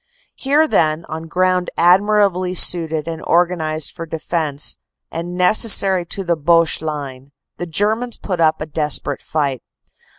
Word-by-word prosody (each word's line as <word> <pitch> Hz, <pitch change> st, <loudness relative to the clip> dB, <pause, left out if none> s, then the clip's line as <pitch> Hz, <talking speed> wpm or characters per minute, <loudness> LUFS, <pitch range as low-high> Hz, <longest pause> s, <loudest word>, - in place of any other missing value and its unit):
"Here, 295 Hz, +4 st, +1 dB
then, 155 Hz, -, 0 dB
on 160 Hz, +1 st, -7 dB
ground 185 Hz, +1 st, 0 dB
admirably 185 Hz, 0 st, +2 dB
suited 160 Hz, -3 st, +3 dB
and 165 Hz, -1 st, -5 dB
organized 160 Hz, -3 st, 0 dB
for 165 Hz, -1 st, -9 dB
defense, 155 Hz, -2 st, -2 dB, 0.3 s
and 170 Hz, +2 st, -6 dB
necessary 190 Hz, -1 st, +3 dB
to 195 Hz, -, -3 dB
the 170 Hz, -2 st, 0 dB
Boche 165 Hz, +1 st, +2 dB
line, 140 Hz, -3 st, -7 dB, 0.2 s
the 175 Hz, -, -5 dB
Germans 215 Hz, +8 st, -1 dB
put 185 Hz, -4 st, -5 dB
up 160 Hz, -1 st, +2 dB
a -, -, -3 dB
desperate 150 Hz, -1 st, -2 dB
fight. 140 Hz, -5 st, -2 dB
170 Hz, 135 wpm, -18 LUFS, 155-185 Hz, 0.3 s, suited